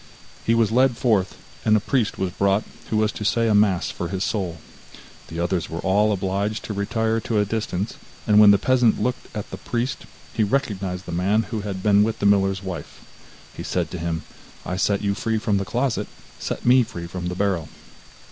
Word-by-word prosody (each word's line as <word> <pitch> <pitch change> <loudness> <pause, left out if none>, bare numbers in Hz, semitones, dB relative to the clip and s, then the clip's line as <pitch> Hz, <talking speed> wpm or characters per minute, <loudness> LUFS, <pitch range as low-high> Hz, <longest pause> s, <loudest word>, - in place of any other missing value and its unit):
He 115 - +2
was 115 -2 +3
led 125 0 +3
forth, 105 -8 +1 0.3
and 110 0 +4
a - - +2
priest 120 +1 0
was 95 -1 -1
brought 100 +3 +2 0.3
who 110 - 0
was 110 0 +2
to - - -6
say 115 +3 +2
a 110 - +3
mass 100 -4 +3
for 90 - -4
his 95 +1 -2
soul. 95 -7 -2 0.7
The 80 - -6
others 85 0 -1
were 80 - -5
all 105 +3 +3
obliged 100 +2 -1
to 105 - -4
retire 110 +3 0
to 110 0 -2
a 105 - +3
distance, 105 -1 -3 0.3
and 105 -1 +5
when 105 -1 +9
the 100 - +7
peasant 125 +1 +3
looked 125 0 -2
at 105 - -6
the - - -5
priest, 120 +2 -3 0.3
he 115 - 0
recognized 100 -6 -1
the - - -6
man 100 +6 +2
who 110 -3 -2
had 100 -2 -5
been 105 -1 +5
with 110 +1 +1
the - - -2
miller's 95 -1 +3
wife. 95 -3 -7 0.5
He - - -6
said - - -2
to 90 - -5
him: 80 -1 -2 0.4
'I 90 - -3
set 100 +2 +1
you 100 -1 +1
free 115 0 -1
from 105 -2 +1
the 100 - -2
closet, 120 +6 -1 0.3
set - - -4
me 125 +1 +6
free 85 -7 -5
from 90 +1 -5
the 90 - -3
barrel. 95 -4 0
100 Hz, 210 wpm, -23 LUFS, 95-110 Hz, 0.7 s, when